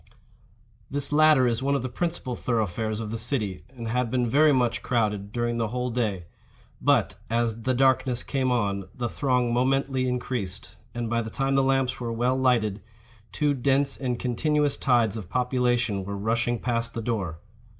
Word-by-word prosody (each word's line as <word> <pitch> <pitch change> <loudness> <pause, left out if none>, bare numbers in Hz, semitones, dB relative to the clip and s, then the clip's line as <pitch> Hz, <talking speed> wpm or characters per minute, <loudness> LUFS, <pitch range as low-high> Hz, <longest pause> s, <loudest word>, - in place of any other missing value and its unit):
This 145 +1 -1
latter 150 -3 +5
is 115 -1 +1
one 140 +1 +1
of 135 - -1
the - - -1
principal 165 -3 -3
thoroughfares 110 -2 -1
of 110 -2 -5
the 115 - -3
city, 110 -6 -1
and 120 -3 -8
had 125 +1 0
been 125 0 +1
very 150 +6 +4
much 125 -3 +1
crowded 105 -4 -1
during 120 0 -1
the 115 - +1
whole 125 +2 -2
day. 105 -7 -1 0.6
But, - - +2
as 115 -1 0
the 130 +2 0
darkness 130 -1 +2
came 130 -2 0
on, 100 -5 0
the 120 -1 -2
throng 125 -1 0
momently 130 +1 +1
increased; 120 -7 -4 0.2
and, 120 -1 -2
by 115 +1 0
the 110 - -5
time 135 +3 -1
the 135 - +4
lamps 135 -1 +1
were 120 -2 -3
well 120 +3 +1
lighted, 115 -6 +1 0.5
two 150 -1 +1
dense 135 +1 +1
and 125 -3 -2
continuous 145 +4 +1
tides 115 -4 +2
of 95 -6 -8
population 125 -5 +1
were 100 +1 -5
rushing 115 +3 0
past 115 -1 -2
the 115 - -3
door. 100 -8 -2
120 Hz, 175 wpm, -26 LUFS, 115-130 Hz, 0.6 s, latter